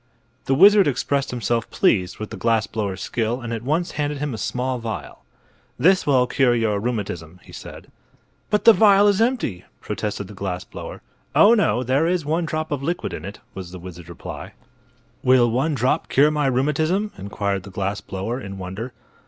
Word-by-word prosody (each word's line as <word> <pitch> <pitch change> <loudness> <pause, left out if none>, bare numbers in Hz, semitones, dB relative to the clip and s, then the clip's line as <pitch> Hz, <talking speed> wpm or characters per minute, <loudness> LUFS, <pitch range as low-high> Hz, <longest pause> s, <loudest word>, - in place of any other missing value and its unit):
The 135 - +2
wizard 200 +3 +7
expressed 140 +1 0
himself 120 -2 -1
pleased 90 -3 +1
with 110 - -7
the - - -5
glass 115 -2 +1
blower's 100 -4 -4
skill 120 +1 -1
and 120 -2 -5
at 115 - -3
once 155 +8 -1
handed 145 0 -2
him 145 -1 -3
a - - -4
small 125 +5 -2
vial. 115 -1 -6 0.5
"This 185 +7 +3
will 130 -3 +4
cure 125 -1 +2
your 110 -3 +1
rheumatism," 95 -7 -4
he - - -15
said. - - -10 0.6
"But 210 0 +1
the 230 - +10
vial 205 -2 +6
is 205 +1 +3
empty!" 225 - 0 0.2
protested 100 -2 -4
the 105 - -11
glass 95 -2 -4
blower. - - -9 0.3
"Oh, 215 - +7
no; 130 - +2
there 135 +6 +2
is 175 -3 0
one 165 +3 0
drop 155 0 -3
of 145 -2 -2
liquid 170 +5 -2
in 75 - -6
it," 100 +2 -8
was 95 -2 -8
the 90 - -8
wizard's 85 -1 -10
reply. 85 - -8 0.7
"Will 125 -2 +4
one 145 +6 0
drop 125 0 0
cure 145 +3 +4
my 150 -2 +1
rheumatism?" 155 +10 +1
inquired 100 0 -3
the 100 - -11
glass 100 +1 -3
blower, 110 +7 -4
in 100 -3 -7
wonder. 95 +7 -6
125 Hz, 185 wpm, -22 LUFS, 100-150 Hz, 0.7 s, the